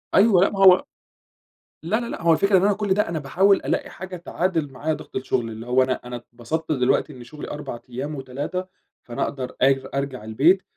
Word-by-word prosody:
أيوه، 195 -2 +6
لأ - - +4
ما 195 - -6
هو 185 -1 +7 1.0
لا، 210 +8 0
لا، 240 - -4
لأ، - - -6
هو 165 0 +4
الفكرة 195 +5 +3
إن - - +3
أنا 205 0 +4
كل 205 -1 0
ده 210 -1 +1
أنا 165 -2 -2
باحاول 190 +8 +3
ألاقي - - -1
حاجة 185 -1 -8
تعادل 170 -4 -2
معايا 150 +5 -2
ضغط - - -10
الشغل، 125 -3 -1
اللي 110 +1 -8
هو 130 +1 +4
أنا 130 0 0
أنا 125 - -6
اتبسطت 120 +7 -5
دلوقتي 135 +2 +1
إن 125 - -11
شغلي 150 +5 -9
4 145 -5 -6
أيام 135 +5 -4
و3 145 +7 -4 0.4
فأنا 120 - -3
أقدر 130 -3 -4
أج 135 0 +3
أرجع 140 -4 -3
البيت 150 - +3
150 Hz, 205 wpm, -23 LUFS, 130-185 Hz, 1.0 s, هو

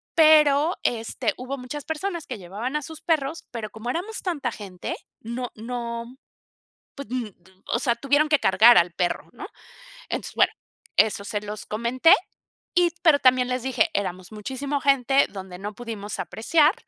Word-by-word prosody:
pero, 310 0 +5
este, 225 -2 -1
hubo 260 +2 -5
muchas 270 +3 -6
personas 335 +1 -3
que 245 - -5
llevaban 205 +9 -5
a 300 - -3
sus 320 +1 -9
perros, 315 -1 -1
pero 225 -3 -5
como 220 +2 -6
éramos 410 +8 -4
tanta 295 -9 -2
gente, 195 -5 -6 0.3
no 240 +2 -4
no 235 +1 -5 0.8
pues, 280 -6 -7
n 245 -5 -3 0.3
o 235 - 0
sea, 240 -1 +2
tuvieron 285 +4 +2
que 300 - +4
cargar 220 +6 +7
al 170 0 +2
perro, 175 0 -2
¿no? - - -8 0.6
Entonces, - - -4
bueno, - - +4 0.4
eso 210 -2 +3
se 210 0 -2
los 210 0 -7
comenté, 235 +8 +4 0.6
y 350 -1 +5
pero 310 -4 +6
también 255 -1 +4
les 250 -1 -1
dije: 260 -3 +1
"Éramos 185 -1 -3
muchísima 265 +6 -3
gente 275 0 +3
donde 190 -2 -8
no 205 +2 -6
pudimos 220 -3 -6
apreciar, 305 - +2
250 Hz, 160 wpm, -24 LUFS, 215-290 Hz, 0.8 s, cargar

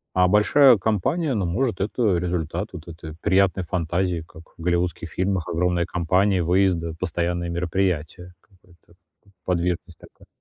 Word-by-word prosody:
А 90 0 +4
большая 115 +6 +5
компания, 125 - 0
ну, 100 -5 -1
может, 95 +2 -1
это 105 -2 +1
результат 85 +2 -2
вот 85 -1 -9
этой 80 -1 -9
приятной 95 0 +2
фантазии, 85 0 -1
как 85 -1 -14
в - - -12
голливудских 85 -1 -1
фильмах: 95 -1 -1
огромная 85 0 0
компания, 90 +2 +1
выезды, 90 -2 +1
постоянные 85 0 -2
мероприятия, 90 0 -2
какая-то 90 -3 -25 0.5
подвижность 90 -1 -2
такая. - - -18
90 Hz, 135 wpm, -23 LUFS, 85-95 Hz, 0.5 s, большая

